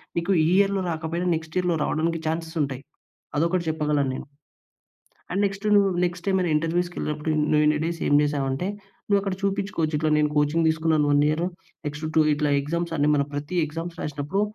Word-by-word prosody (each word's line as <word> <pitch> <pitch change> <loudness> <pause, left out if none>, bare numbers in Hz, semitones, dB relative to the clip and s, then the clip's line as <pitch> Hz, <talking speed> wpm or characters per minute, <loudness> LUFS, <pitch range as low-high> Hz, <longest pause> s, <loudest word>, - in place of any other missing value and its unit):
మీకు 170 +3 0 0.2
ఈ - - +3
ఇయర్‌లో 200 -1 +3
రాకపోయినా 165 +2 -2
నెక్స్ట్ 160 +1 -7
ఇయర్‌లో 180 -2 +1
రావడానికి 165 +2 0
చాన్స్‌స్ 160 +1 -3
ఉంటాయి. 135 -2 -4 0.6
అదొకటి 170 +3 +1
చెప్పగలను 150 -3 0
నేను. - - -6 1.0
అండ్ 195 +3 0
నెక్స్ట్ 200 +1 -4
నువు 200 -1 +5 0.2
నెక్స్ట్ 175 +1 -5
ఏమైనా 185 -3 +1
ఇంటర్‌వ్యూస్‌కి 175 +3 0
వెళ్ళినప్పుడు 150 +1 -2 0.2
"నువ్వు 150 0 +4
ఇన్ని 150 0 +3
డేస్ 170 -1 -3
ఏమి 145 0 +5
చేసావు?" 145 -2 0
అంటే, 135 +8 -2 0.4
నువ్వు 200 -1 +3
అక్కడ 195 -2 -2
చూపిచ్చుకోవచ్చు. 195 -6 -1
ఇట్ల 155 0 +1
నేను 150 0 +2
కోచింగ్ 150 +3 +2
తీసుకున్నాను 160 -2 +2
1 145 - +4
ఇయర్‌. 160 +3 0 0.4
నెక్స్ట్ 150 +2 -5
టూ 155 - +6
ఇట్లా 150 0 0
ఎగ్జామ్స్ 170 +3 -3
అన్ని 145 +1 +3
మన 140 - +1
ప్రతి 145 +5 -3
ఎగ్జామ్స్ 165 +2 -6
రాసినప్పుడు 150 +6 -2
160 Hz, 175 wpm, -25 LUFS, 150-175 Hz, 1.0 s, టూ